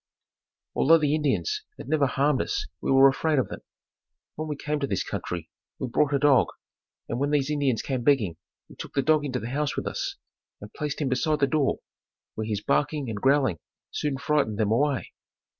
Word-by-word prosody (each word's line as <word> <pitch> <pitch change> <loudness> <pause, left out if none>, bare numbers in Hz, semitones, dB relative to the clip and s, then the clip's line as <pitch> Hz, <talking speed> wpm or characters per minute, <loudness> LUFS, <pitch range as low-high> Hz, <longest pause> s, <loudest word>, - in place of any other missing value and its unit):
Although 165 +4 +5
the 150 -2 +1
Indians 155 - 0 0.2
had - - -9
never 150 -3 +2
harmed 140 +1 +2
us - - -2 0.2
we - - -1
were 135 0 +8
afraid 150 +3 +1
of 130 - +1
them. - - -6 0.7
When 155 +1 -5
we 150 - -3
came 150 +1 -2
to 140 - -1
this 100 - -1
country 85 -3 -5 0.3
we 130 - -4
brought 145 +4 +2
a - - +4
dog, 140 -3 +4 0.6
and 120 - -3
when 140 +1 +1
these 145 -1 +1
Indians 140 -6 +1
came 130 -3 -2
begging 115 - +2 0.3
we - - -15
took - - -8
the 140 - +2
dog 155 0 +3
into 130 -3 -2
the 115 - -5
house 145 0 -1
with - - -3
us - - -3 0.4
and 105 +1 -11
placed 150 0 -3
him 140 - 0
beside 150 +4 +1
the 140 - +4
door, 140 0 0 0.5
where 110 0 -4
his 105 -2 -2
barking 145 -2 0
and 105 -2 -5
growling 135 - +3 0.3
soon 145 -3 -2
frightened 140 -7 0
them 105 -1 +1
away. 140 +3 +1
140 Hz, 200 wpm, -26 LUFS, 125-150 Hz, 0.7 s, were